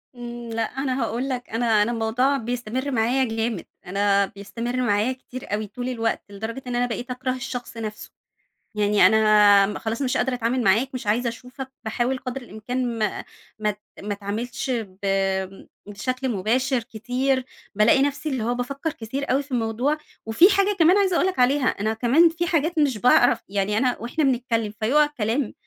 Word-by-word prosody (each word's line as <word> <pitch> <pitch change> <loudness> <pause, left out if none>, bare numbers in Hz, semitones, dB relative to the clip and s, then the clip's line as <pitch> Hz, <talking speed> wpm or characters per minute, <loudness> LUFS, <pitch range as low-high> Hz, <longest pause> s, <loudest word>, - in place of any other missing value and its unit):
إمم, 240 -1 -7
لأ 230 - -1
أنا 265 +2 -2
هأقول 235 +4 -2
لك 250 -2 -4
أنا 225 -2 +2
أنا 235 - -1
الموضوع 240 +5 +1
بيستمر 245 +3 -3
معايا 245 +2 +2
جامد 225 -4 -2 0.2
أنا 200 +1 +2
بيستمر 230 +5 -6
معايا 215 +2 +1
كتير 255 -3 -9
أوي 215 0 -1
طول 245 +5 -5
الوقت 225 -2 -1
لدرجة 220 +6 -6
إن 245 - -2
أنا 245 0 +2
بقيت 245 +1 -4
أكره 255 +1 -2
الشخص 245 -2 -6
نفسه، 215 -1 -6 0.6
يعني 210 -1 +4
أنا 210 -2 +5
خلاص 225 +3 -3
مش 255 -2 0
قادرة 260 - 0
أتعامل 245 +1 0
معاك 225 +7 +3
مش 255 -3 -5
عايزة 235 +3 +1
أشوفك 255 +3 -9
باحاول 240 +4 -1
قدر 255 +1 -5
الإمكان 240 +1 -4
ما 215 -2 -1 0.3
ما 210 0 +1
أت 210 0 -6 0.2
ما 205 +1 -3
أتعاملش 220 +6 -4
ب 220 -7 -3 0.9
بشكل 255 +6 -3
مباشر 240 +4 0
كتير، 250 +4 -1 0.3
بالاقي 215 +6 +5
نَفْسي 285 +2 -1
اللي 260 -6 -2
هو 240 +2 0
بافكّر 275 +5 -3
كتير 265 +5 -4
أوي 275 +2 +2
في 275 - -19
الموضوع، 245 +5 0 0.3
وفي 225 - +6
حاجة 395 +1 +2
كمان 340 +4 +6
عايزة 385 -3 +2
أقول 365 - +3
لك 375 - -3
عليها 260 +2 +3
أنا 215 +2 0
كمان 260 +9 +4
فيه 335 +1 -2
حاجات 330 0 0
مش 280 -6 +2
باعرف 245 +2 +4
يعني 200 +1 0
أنا 250 +1 +1
وإحنا 240 +7 -2
بنتكلم 235 -5 0
فيقع 280 +7 +4
كلام 250 -2 -2
240 Hz, 175 wpm, -24 LUFS, 220-265 Hz, 0.9 s, وفي